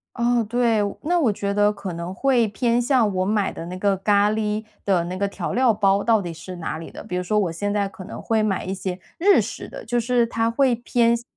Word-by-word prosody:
哦， 235 0 +2
对。 230 0 +1 0.2
那 350 +3 +2
我 250 -10 +3
觉 200 0 -2
得 205 0 +3
可 195 -4 -6
能 170 +2 -5
会 245 +1 +2
偏 235 +4 +1
向 240 -5 +2
我 185 0 0
买 205 -1 +1
的 165 - -7
那 180 +1 -6
个 200 +1 +2
咖 205 +1 +3
喱 215 0 -1 0.2
的 185 -4 +2
那 180 - -4
个 200 +1 0
调 200 - -4
料 250 -2 +4
包 200 -1 +2
到 225 -2 +3
底 175 -3 -5
是 175 +3 -9
哪 160 -2 -4
里 165 - -8
的？ - - -9
比 180 - -5
如 180 - -1
说 210 +4 0
我 185 -5 0
现 205 +5 -2
在 205 -1 +1
可 190 -1 -11
能 - - -8
会 225 -1 +1
买 205 -3 -1
一 190 - -3
些 190 -1 -4 0.2
日 395 +4 +5
式 - - -6
的， - - -9
就 240 +1 0
是 240 0 +2
它 230 0 0
会 255 +1 +2
偏 235 0 +2
向 235 - -6
210 Hz, 270 characters per minute, -23 LUFS, 190-235 Hz, 0.2 s, 日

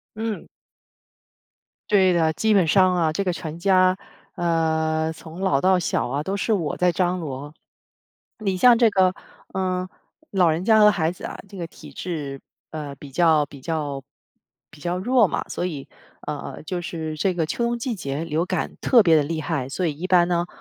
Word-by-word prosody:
嗯。 220 -1 -4 1.4
对 190 -3 +5
的， 160 -2 +2
基 215 +7 +1
本 190 -4 +4
上 185 +2 +4
啊， 165 -3 +1
这 200 +5 -1
个 180 - 0
全 165 -1 -6
家， 185 0 +4 0.4
呃， 160 -2 0
从 160 +2 -11
老 145 -8 +2
到 185 0 +4
小 165 -7 -1
啊， 140 +3 -2
都 195 +5 -2
是 220 - 0
我 170 -8 -1
在 180 0 +3
张 180 0 0
罗。 145 -1 -6 0.9
你 195 -4 -1
像 240 +4 +6
这 235 -1 +6
个， 185 -2 +3 0.4
呃， 185 -1 -1 0.4
老 180 -4 +3
人 160 +3 -1
家 220 +1 +5
和 210 0 +8
孩 165 -4 0
子 - - -12
啊， - - -6
这 200 - -11
个 170 - -4
体 - - -14
质， 145 -6 -5 0.3
呃， 150 -3 -6
比 140 0 -11
较 160 0 +3
比 140 -1 -13
较 145 -3 -3 0.7
比 150 - -16
较 175 +3 -2
弱 240 +3 +3
嘛， - - -2
所 180 - -2
以， 150 -6 -6 0.4
呃， 150 0 -6
就 180 +2 -3
是 160 -2 -5
这 185 +4 0
个 165 -3 0
秋 235 - -2
冬 235 0 -1
季 235 0 -2
节 150 -4 -4
流 165 +2 -1
感 185 -3 -3
特 245 -4 +5
别 165 -5 +5
地 150 - +4
厉 160 +2 -3
害。 145 -4 -2
所 175 +6 -2
以 155 - 0
一 185 - -3
般 180 -2 +4
呢， 175 0 0
175 Hz, 205 characters per minute, -23 LUFS, 155-190 Hz, 1.4 s, 和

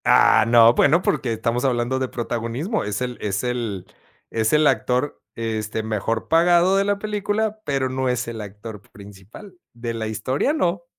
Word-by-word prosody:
Ah, - - +5
no, 115 0 +7
bueno, 160 +8 +3
porque 135 -5 0
estamos 115 +2 -1
hablando 125 0 0
de 130 - -1
protagonismo, 120 - -3
es 105 +2 -3
el 125 -1 -4
es 100 +1 -2
el 115 -7 -3 0.5
es 110 -1 0
el 150 0 +4
actor, 130 +1 0
este, 110 -1 -3
mejor 110 +1 -2
pagado 175 +3 +4
de 195 0 +2
la 205 0 +1
película, 210 +1 -2
pero 135 -2 0
no 130 0 -1
es 125 -2 -1
el 115 -2 -6
actor 105 +1 -9
principal. 100 - -13 0.2
De 120 0 -5
la 110 -1 -4
historia, 130 - -1
no. 175 - -1
125 Hz, 170 wpm, -22 LUFS, 110-155 Hz, 0.5 s, no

